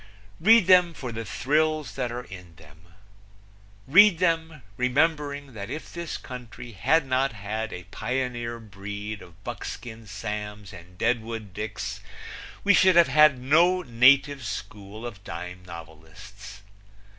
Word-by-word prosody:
"Read 225 -2 +6
them 180 -2 +5
for 125 -4 -6
the 115 0 -5
thrills 150 +5 0
that 125 -3 -3
are 120 +1 -5
in 90 -6 -12
them. 80 +3 -18 1.0
Read 190 +5 +7
them, 165 -4 0
remembering 145 +2 0
that 100 -1 -7
if 150 +4 -7
this 170 -1 -5
country 125 -2 -9
had 145 +10 +2
not 130 0 0
had 110 +1 -4
a 90 - -7
pioneer 125 -2 -3
breed 105 0 -7
of 90 +2 -16
Buckskin 110 +1 -7
Sams 105 -1 -6
and 90 0 -13
Deadwood 110 -3 -2
Dicks 105 +1 -5 0.6
we 200 - +5
should 185 -1 +5
have 170 -4 +6
had 150 0 +6
no 170 +8 +3
native 130 +3 +4
school 105 0 -7
of 105 -5 -8
dime 90 +1 -7
novelists. 85 +6 -12
120 Hz, 135 wpm, -26 LUFS, 105-150 Hz, 1.0 s, Read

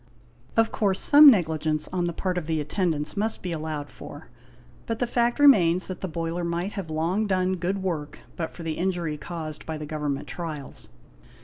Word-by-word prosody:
Of 225 0 +3
course 195 -3 0
some 295 0 +9
negligence 155 - +1
on 180 -1 0
the 170 - -1
part 180 +1 -2
of 160 - -9
the 160 -1 0
atten 175 +5 -1
dants 150 -1 -3
must 215 +2 -1
be 180 - -3
allowed 155 -2 -4
for, - - -11 0.6
but 230 - -2
the 245 - 0
fact 240 0 +1
remains 185 - +5
that 185 - -5
the 190 - -2
boiler 165 +1 -3
might 170 +3 -2
have 190 -5 -5
long 170 +7 0
done 185 -1 +1
good 190 +3 -2
work 155 -6 -3 0.2
but 165 -2 -5
for 170 - -8
the 160 -1 -3
injury 175 -4 -1
caused 155 -1 -7
by 160 -1 -3
the 150 - -6
Government 150 -2 -3
trials. 155 -6 -7
170 Hz, 195 wpm, -25 LUFS, 155-190 Hz, 0.6 s, some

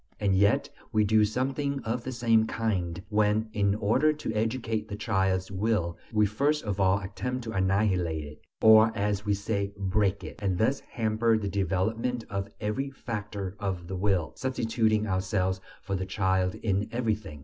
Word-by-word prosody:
And 100 -2 +2
yet 100 +2 +3 0.2
we 110 -1 +3
do 110 +1 +4
something 135 +5 -1
of 115 +1 -2
the 130 - -4
same 115 -2 +3
kind 95 -7 -2
when, 105 +1 +1
in 100 -1 +2
order 110 +9 +3
to 150 -7 -4
educate 110 0 -1
the 105 - -5
child's 95 -3 0
"will," 95 -4 0 0.2
we 105 -1 +3
first 140 +9 +1
of 100 -2 -3
all 95 0 +4
attempt 125 +6 -4
to 110 - -5
annihilate 95 -5 +1
it, 75 +1 -11 0.2
or, 110 0 +8
as 105 0 -1
we 100 - +3
say, 100 0 -2
"break" 100 0 0
it, - - -9
and 95 -3 0
thus 120 +8 +2
hamper 110 -1 +1
the 105 -2 -3
development 110 +6 -1
of 100 0 -3
every 105 +7 -2
factor 105 -7 -5
of 95 -4 -3
the 95 - -4
will, 95 -3 0
substituting 115 -4 +1
ourselves 95 -1 0 0.2
for 100 - -2
the 95 0 -3
child 95 -2 +1
in 100 -1 -1
everything. 110 -10 -2
105 Hz, 170 wpm, -28 LUFS, 95-115 Hz, 0.2 s, or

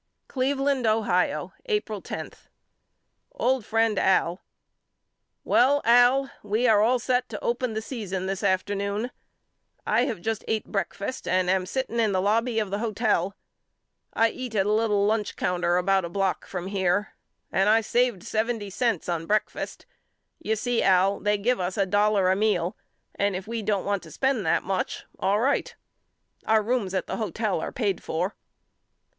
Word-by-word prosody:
Cleveland, 270 -1 0
Ohio, 215 -5 +1
April 425 -2 -1
10. - - -6 1.0
OLD 260 - +1
FRIEND 225 -1 +1
AL: 180 -1 +2 1.0
Well 275 +4 +4
Al 245 +3 +5
we 215 +4 0
are 215 -3 +5
all 240 +4 +4
set 250 +1 0
to 210 - -7
open 240 0 -1
the 220 - -2
season 195 -7 -4
this 195 0 -3
afternoon. 200 +4 -1 0.7
I - - +2
have 220 - -3
just 220 +3 -3
ate 220 -1 -1
breakfast 200 +3 -4
and 185 0 +2
I - - +5
am 185 -1 -1
sitting 245 0 -2
in 220 -3 +2
the 185 - +2
lobby 225 +4 +1
of 210 -3 0
the 200 - -1
hotel. 210 -4 0 0.8
I 225 0 +2
eat 250 -3 -6
at 195 -2 +2
a 210 - +1
little 210 -2 +2
lunch 210 -1 0
counter 175 -1 0
about 190 +1 +2
a 170 - -4
block 195 +1 -1
from 180 -2 -5
here 195 +1 0 0.4
and 195 +2 +2
I 225 +1 +5
saved 235 -3 +1
seventy 220 -2 -2
cents 230 -4 0
on 165 -2 -2
breakfast. 215 +1 -2 0.5
You 220 - -1
see 240 +2 0
Al 190 +1 +3
they 210 0 +1
give 240 +4 +1
us 180 0 -2
a 195 - +3
dollar 205 -1 +3
a - - +3
meal 195 -4 +1 0.4
and 200 -1 0
if 185 +1 -5
we 230 0 -3
don't 205 -2 -1
want 200 -1 0
to - - -12
spend 265 -6 0
that - - +2
much 190 0 -3
all 195 +2 +2
right. 270 +5 0 0.7
Our 220 -1 +4
rooms 215 -5 -1
at 185 - -1
the - - -4
hotel 215 -4 -1
are - - -4
paid 205 -7 -1
for. 175 +5 -2
210 Hz, 170 wpm, -26 LUFS, 190-235 Hz, 1.0 s, Al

